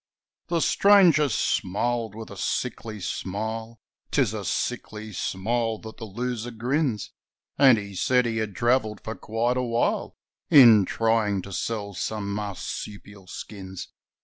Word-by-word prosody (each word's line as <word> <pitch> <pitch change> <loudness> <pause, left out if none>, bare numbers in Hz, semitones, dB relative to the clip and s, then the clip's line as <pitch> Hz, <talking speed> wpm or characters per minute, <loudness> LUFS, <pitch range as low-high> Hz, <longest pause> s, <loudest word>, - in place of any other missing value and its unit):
The 170 -1 0
stranger 180 -9 +5
smiled 115 +1 -1
with 110 -1 -8
a - - -8
sickly 110 +3 -3
smile 110 +5 -4 0.3
'Tis - - +1
a - - -4
sickly 110 0 -3
smile 110 +5 -1
that 110 0 -11
the 115 - -7
loser 120 +2 -4
grins 120 0 -1 0.5
And 130 -4 +7
he 100 -1 -6
said 125 +6 +2
he 115 -1 -1
had 110 -3 -3
travelled 120 -2 +1
for 110 - -5
quite 115 +3 -1
a - - +1
while 120 -1 -1 0.3
In 120 - +8
trying 110 -4 +1
to 100 - -9
sell 100 +1 -3
some 100 +1 -3
marsupial 100 -1 -6
skins. 95 -1 -8
110 Hz, 135 wpm, -25 LUFS, 100-120 Hz, 0.5 s, In